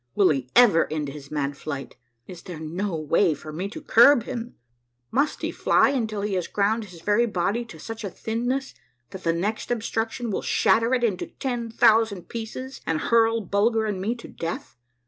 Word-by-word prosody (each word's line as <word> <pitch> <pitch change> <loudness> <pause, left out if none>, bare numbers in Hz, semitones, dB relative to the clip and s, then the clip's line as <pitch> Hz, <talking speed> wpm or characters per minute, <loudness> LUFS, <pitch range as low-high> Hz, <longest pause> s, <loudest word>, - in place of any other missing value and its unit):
Will 200 -3 +5
he 135 -4 -1
never 220 -12 +5
end 150 -2 -2
his 140 0 -10
mad 145 -2 -2
flight? 140 -1 -6 0.3
Is 180 -2 -10
there 175 -4 -8
no 170 +4 -3
way 160 +2 +2
for 155 +1 -10
me 185 +5 -3
to - - -9
curb 240 +1 +6
him? 240 -1 -6 0.6
Must 280 +5 +1
he - - -1
fly - - +3
until 220 -6 -2
he 205 0 -2
has 180 -3 -1
ground 215 +2 0
his 175 -4 -13
very 210 +6 +2
body 205 +3 -1
to 175 - -12
such* 225 +7 -7
a 200 - -3
thin 225 +6 -3
ness 265 +1 -1 0.4
that 190 - -9
the 165 - +2
next 195 +7 -2
obstruction 225 0 -2
will - - -1
shatter 230 +3 +3
it 245 - -1
into 205 -6 0
ten 240 -3 -4
thousand 220 -4 +3
pieces, 235 +4 -6
and 160 -1 0
hurl 230 +2 +3
Bulger 220 +3 +1
and 200 -3 -2
me 220 +5 -1
to 235 - -11
death 165 0 -6
210 Hz, 195 wpm, -25 LUFS, 170-230 Hz, 0.6 s, curb